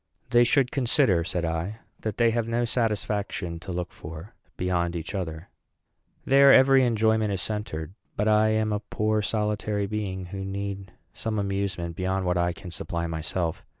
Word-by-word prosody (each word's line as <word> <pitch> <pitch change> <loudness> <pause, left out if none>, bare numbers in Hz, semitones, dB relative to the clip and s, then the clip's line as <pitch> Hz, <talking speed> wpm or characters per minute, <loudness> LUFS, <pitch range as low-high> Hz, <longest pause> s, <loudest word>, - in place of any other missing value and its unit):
"They 120 0 +6
should 125 +1 +3
consider," 120 - +2
said 85 0 -2
I, 85 +6 -2 0.2
"that 110 -3 -4
they 115 -1 +4
have 115 -1 0
no 120 +1 +1
satisfaction 105 -7 -1
to 95 - -7
look 90 0 -3
for 80 +7 -9 0.2
beyond 85 -1 0
each 85 +3 -5
other; 85 -3 -4 0.8
there 140 +1 +7
every 135 0 +7
enjoyment 110 -2 +2
is 95 - -1
centred; 95 -7 -4 0.2
but 105 - 0
I 110 0 +5
am 110 0 +1
a 105 - 0
poor 110 0 0
solitary 105 -1 -1
being, 100 -3 -3
who 95 0 -4
need 100 -1 -4 0.2
some 110 -1 -3
amusement 100 -4 -2
beyond 95 +1 -1
what 90 0 +1
I 85 0 +2
can 85 +1 -9
supply 85 -3 -3
myself. 80 +1 -3
100 Hz, 165 wpm, -26 LUFS, 90-110 Hz, 0.8 s, there